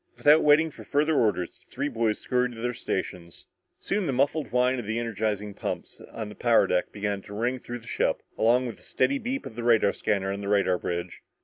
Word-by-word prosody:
Without 150 +2 +6
waiting 155 +2 +5
for - - -12
further 150 +3 +1
orders, 105 - +1
the - - -31
three 140 +3 -2
boys 115 -5 0
scurried 125 -1 0
to 115 - -10
their 125 +1 -1
stations. 90 -6 -5 0.3
Soon 200 -3 -1
the - - +1
muffled 140 -1 0
whine 125 +1 +2
of 115 - -6
the 110 +1 -1
energizing 105 -3 -2
pumps - - -5
on 110 -2 -5
the 105 - -9
power 120 +1 +4
deck 90 - 0
began 100 -1 -2
to 100 +1 -10
ring 120 +4 -1
through 120 0 -6
the 115 - -15
ship, - - 0
along 120 +3 +3
with 120 - -5
the - - -19
steady 135 +2 +1
beep 260 +4 -3
of 110 - -8
the 120 - -5
radar 115 -4 +4
scanner 100 -2 -1
on 100 - -5
the 100 - -5
radar 100 -3 +2
bridge. 85 0 -4
115 Hz, 225 wpm, -27 LUFS, 105-130 Hz, 0.3 s, Without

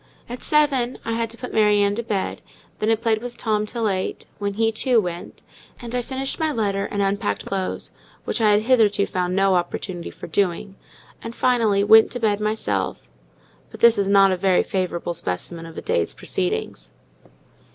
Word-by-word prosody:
At 245 +1 -7
seven 275 -5 +2
I 230 - -2
had 230 0 -1
to 230 - -11
put 250 0 -7
Mary 210 -1 +4
Ann 200 0 +2
to 230 - -2
bed; 210 -4 -3 0.4
then 215 - 0
I 225 - +4
played 220 -1 0
with 245 0 -7
Tom 215 -1 -1
till 230 0 -2
eight, 190 -2 -2
when 200 -1 -2
he, 225 +1 +2
too, 240 +2 +2
went; 175 -4 -6 0.4
and 235 -1 -8
I 250 - 0
finished 265 +2 -3
my 315 -1 +1
letter 200 -6 -1
and 200 -1 -1
unpacked 195 - -1
my - - -8
clothes, 190 -1 -3 0.3
which - - -1
I 215 - +4
had 210 +1 +2
hitherto 220 -5 +3
found 180 0 -2
no 195 0 +3
opportunity 175 0 -3
for - - -10
doing, 190 +2 -1 0.5
and, 230 +1 -7
finally, 225 -6 +2
went 220 +2 +7
to 245 - -4
bed 210 -3 +1
myself. 210 - -2 0.6
But - - -13
this 235 -2 +6
is 200 - +1
a 195 -1 +5
very 185 0 +3
favourable 175 -2 -2
specimen 165 - -4
of 165 - -12
a - - -6
day's 85 0 -1
proceedings. - - -3
205 Hz, 190 wpm, -22 LUFS, 185-230 Hz, 0.6 s, went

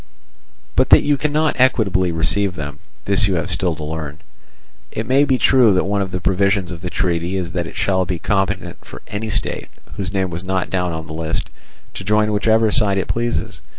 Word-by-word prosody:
But - - +3
that - - +7
you 145 0 +3
cannot 150 0 0
equitably 100 -8 +3
receive 90 +4 0
them, 75 -3 -6 0.3
this 100 0 +3
you 95 - 0
have 80 - -2
still 90 -4 0
to 75 - -7
learn. 75 -1 -5 0.7
It 110 - -4
may 135 +4 +4
be 135 -2 +2
true 125 -6 +5
that 90 - +2
one 100 +1 0
of 95 - -2
the 95 - -3
provisions 95 0 +1
of 85 -2 -7
the 90 - -4
treaty 90 0 -1
is 90 -2 -3
that 85 -1 -2
it - - -10
shall 95 -1 +1
be 90 0 -2
competent 95 +3 -2
for - - -11
any 110 +2 -4
state, - - -2 0.3
whose 95 -2 -2
name 95 -2 -1
was 85 +2 -5
not 95 0 -2
down 90 -2 0
on 80 -1 -5
the 80 - -8
list, 80 0 -3 0.4
to - - -7
join 105 +1 +2
whichever 110 +1 +3
side 105 -5 +3
it 95 - -1
pleases. 120 0 -2
95 Hz, 210 wpm, -19 LUFS, 85-105 Hz, 0.7 s, that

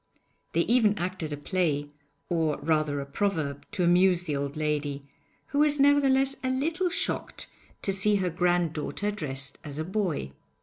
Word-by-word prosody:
They 170 - +3
even 220 -1 +3
acted 175 -4 -3
a 145 - -3
play 145 -2 -1 0.4
or, 160 -3 0
rather, 150 -1 0
a - - -5
proverb 145 -2 -2
to 180 - 0
amuse 180 +1 +4
the 155 -5 -2
old 140 +1 -3
lady, 145 -2 -2 0.4
who 285 - 0
was 295 -1 +3
nevertheless 275 -1 +4
a 260 - 0
little 325 +8 0
shocked 360 - -2 0.4
to 195 - +1
see 205 +2 +3
her 185 -3 0
granddaughter 175 +2 0
dressed 140 -8 -3
as 145 -2 -7
a 155 - -1
boy. 180 - -2
175 Hz, 160 wpm, -27 LUFS, 150-210 Hz, 0.4 s, amuse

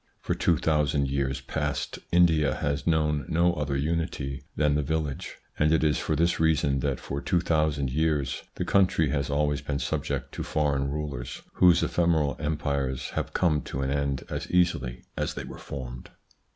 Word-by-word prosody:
For - - -1
two 85 - +2
thousand 75 -2 +1
years 70 -1 -1
past 75 -2 -3
India 80 -4 +4
has 70 -1 -2
known 75 -3 +2
no 85 +2 +3
other 75 -4 -1
unity 75 -3 -2
than 75 -1 +2
the 75 - +2
village, 75 -1 -3 0.2
and 75 +1 +4
it 80 -1 +3
is 75 -1 +2
for 80 - -1
this 85 +3 +2
reason 75 -4 +2
that 70 -1 -1
for 70 +1 -4
two 90 -3 +1
thousand 75 -5 +1
years 75 -2 0
the - - -2
country 90 -6 +3
has 70 -2 -1
always 75 0 +1
been 70 - -2
subject - - -2
to - - -5
foreign 70 -3 0
rulers, 70 -4 -5
whose 90 -2 +5
ephemeral 80 -4 +2
empires 70 -4 -2
have - - -3
come 80 -5 +2
to 65 +2 -4
an 65 - -1
end 70 -2 -1
as - - -5
easily 70 -9 +1
as - - -2
they - - -4
were - - -9
formed. 65 -3 -7
75 Hz, 175 wpm, -27 LUFS, 70-80 Hz, 0.2 s, whose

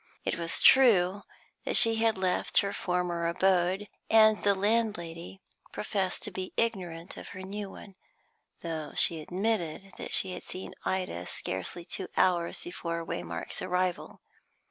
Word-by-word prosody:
It - - 0
was 170 0 -1
true 205 -7 +6 0.4
that - - +4
she 225 -1 +7
had 225 -2 +2
left 185 -1 +1
her 200 0 -3
former 180 -2 -1
abode, 185 +2 +1 0.2
and 220 -1 +6
the 200 -1 +3
landlady 190 -4 -1 0.3
professed 195 -3 -2
to 210 - -3
be 185 0 -5
ignorant 180 -7 -2
of - - -9
her 185 -1 -9
new 200 +1 -5
one, 195 +1 -12 0.7
though 160 -3 -5
she 165 -2 +3
admitted 195 0 -2
that - - -6
she 190 - +1
had - - -7
seen 185 - -7
Ida 180 - -2
scarcely 95 - -3
two 190 - -5
hours 175 -2 +2
before 170 -1 -4
Waymark's - - -4
arrival. 180 -1 -2
185 Hz, 145 wpm, -29 LUFS, 170-205 Hz, 0.7 s, she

